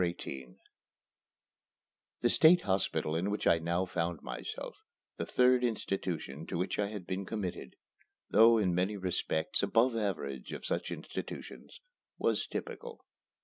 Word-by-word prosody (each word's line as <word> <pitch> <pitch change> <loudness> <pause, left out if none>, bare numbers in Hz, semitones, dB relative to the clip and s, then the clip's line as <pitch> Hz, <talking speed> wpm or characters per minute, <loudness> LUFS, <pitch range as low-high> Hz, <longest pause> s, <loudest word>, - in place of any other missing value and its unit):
XVIII 70 -8 -4 1.6
The - - +3
State 175 +3 +7
Hospital 95 -5 0
in 90 +5 0
which 105 - -2
I 85 - +5
now 85 +3 0
found 85 -2 -2
myself, - - -6 0.4
the - - -3
third 125 0 +4
institution 90 - -2
to - - -3
which 90 +4 -1
I 100 - +2
had 100 -3 -6
been 95 +2 -3
committed, 100 -3 -5 0.6
though 115 +2 +7
in 95 -5 +2
many 95 +4 0
respects 90 -3 -1
above 115 +5 +3
the 115 - -1
average 70 - -3
of - - -6
such 85 - -1
institutions, - - -7 0.4
was - - +1
typical. 480 -1 -6
95 Hz, 140 wpm, -32 LUFS, 85-110 Hz, 1.6 s, State